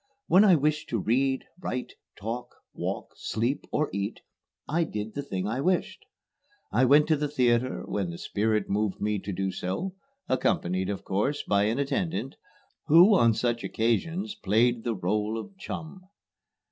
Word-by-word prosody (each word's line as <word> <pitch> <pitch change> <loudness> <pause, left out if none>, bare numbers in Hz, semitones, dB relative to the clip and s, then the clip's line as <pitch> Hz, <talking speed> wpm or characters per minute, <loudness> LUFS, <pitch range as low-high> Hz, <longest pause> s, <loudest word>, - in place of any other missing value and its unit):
When 185 +4 +6
I 195 -4 +7
wished 150 +1 0
to 115 - 0
read, 130 +6 +1
write, 125 -8 -4 0.2
talk, 120 +4 -5 0.2
walk, - - -4
sleep, 120 +6 -2
or 150 0 +1
eat, 100 +2 -3 0.5
I 170 +3 +1
did 105 -7 -5
the 145 - -3
thing 95 -9 -4
I 120 +5 -1
wished. 180 +4 0 0.7
I 130 - +4
went 145 +4 +6
to 155 - +5
the 150 0 -1
theatre 125 -3 +1
when 100 -4 -2
the 85 - -6
spirit 105 +2 0
moved 105 0 -1
me 105 0 0
to 100 - -5
do 95 +1 -1
so, 165 - -3 0.3
accompanied, 95 -7 0
of 100 - -4
course, 120 +10 -1
by 100 0 +2
an 110 +4 0
attendant, 140 - -1 0.5
who 170 +7 +8
on 115 - +5
such 120 +1 0
occasions 165 - 0
played 115 - +2
the 115 -2 -1
rôle 105 +4 -1
of 200 - -9
chum. 185 -1 -7
120 Hz, 160 wpm, -27 LUFS, 105-150 Hz, 0.7 s, who